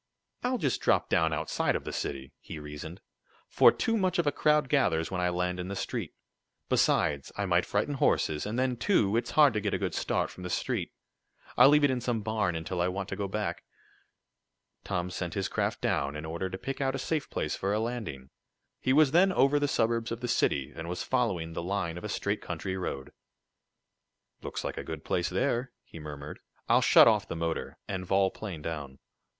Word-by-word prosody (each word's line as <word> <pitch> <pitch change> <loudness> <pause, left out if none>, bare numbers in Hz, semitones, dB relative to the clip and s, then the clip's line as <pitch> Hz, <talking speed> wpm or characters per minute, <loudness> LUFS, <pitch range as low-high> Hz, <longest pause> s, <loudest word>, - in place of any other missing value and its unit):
"I'll 250 +1 +1
just 140 - -1
drop - - +2
down 80 0 +3
outside 75 - 0
of - - -2
the - - -6
city," 65 -1 -4
he - - -8
reasoned, 75 +3 -8 0.5
"for - - +6
too 225 - 0
much 185 -4 +1
of 170 - +2
a 145 - +3
crowd 150 0 +2
gathers 80 - +1
when 90 -1 -1
I 90 - +2
land 90 +1 -1
in 90 - -4
the 100 - -4
street. - - -4 0.5
Besides 70 -2 +2
I 100 - 0
might 90 -1 +2
frighten 105 +8 0
horses, 80 - +1
and 110 +3 -3
then, 130 -1 +1
too, 115 - +2
it's 115 0 0
hard 150 -5 +5
to 105 - 0
get - - 0
a - - +1
good - - -2
start - - -1
from - - -12
the 90 - -5
street. - - -2 0.6
I'll - - +8
leave 150 0 +5
it 145 - +5
in 125 -1 -1
some 120 -2 -1
barn 105 -5 0
until 85 +2 -3
I 90 - +2
want 95 +1 -3
to - - -3
go 100 0 -2
back." 105 +1 -3 1.2
Tom 90 0 -2
sent 90 -2 -4
his 95 -1 0
craft - - -2
down, 70 +1 0
in 75 +1 -5
order 85 +4 -3
to 95 - -5
pick 135 +7 -5
out 135 0 0
a - - -1
safe 150 +2 -2
place - - -2
for 95 - -2
a 105 - +1
landing. 110 - -4 0.5
He 130 - +1
was 150 -1 +5
then 185 +4 +5
over 140 -3 +3
the 145 - +1
suburbs 115 -2 0
of 115 +1 -4
the 125 - -2
city, 70 - +1
and 85 +1 -6
was 90 - -3
following 95 -11 0
the 85 - -3
line 90 -2 -2
of - - -14
a 105 - -4
straight 100 +1 -1
country 90 +2 -4
road. 70 -7 -4 1.3
"Looks - - -5
like - - -4
a - - -5
good 80 -2 -7
place 85 -1 0
there," 120 +5 -1
he 80 - -12
murmured. 75 -1 -8 0.3
"I'll - - +5
shut - - +7
off 105 -3 +3
the - - -4
motor, 85 0 -3
and 95 -2 -3
vol 95 +1 +2
plane 90 -8 -7
down." 75 -5 -5
100 Hz, 215 wpm, -29 LUFS, 85-125 Hz, 1.3 s, I'll